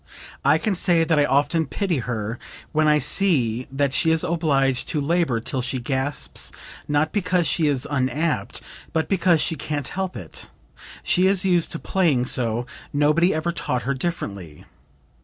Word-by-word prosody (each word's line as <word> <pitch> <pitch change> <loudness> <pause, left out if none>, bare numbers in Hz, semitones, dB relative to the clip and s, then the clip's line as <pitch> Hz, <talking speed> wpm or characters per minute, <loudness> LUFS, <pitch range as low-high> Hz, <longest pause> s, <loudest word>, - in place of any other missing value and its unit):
I 145 +3 +5
can 205 +5 -1
say 175 -2 +3
that 160 -2 +2
I 145 - +4
often 145 +3 +1
pity 175 -2 -1
her 115 -2 -4 0.3
when 155 -1 +2
I 150 0 +5
see 130 - +1
that 135 0 0
she 160 +3 +2
is 160 0 +2
obliged 140 -6 +1
to 155 - -2
labor 155 -4 +1
till 130 +3 -3
she 130 +1 -3
gasps, 130 +3 -1 0.4
not 145 +1 +1
because 180 -4 +1
she 160 -1 +1
is 140 -3 0
unapt, 145 +3 -1 0.3
but 160 -1 0
because 180 -4 +3
she - - 0
can't 145 -2 -4
help 190 -7 -3
it, 90 -7 -8 0.5
she 185 +1 +3
is 195 -1 +2
used 175 -3 +2
to - - -3
playing 160 -10 +1
so, 120 -1 0 0.3
nobody 150 +5 +3
ever 155 +1 -1
taught 125 -7 -2
her 140 - 0
differently. 100 - -5
150 Hz, 165 wpm, -23 LUFS, 130-170 Hz, 0.5 s, I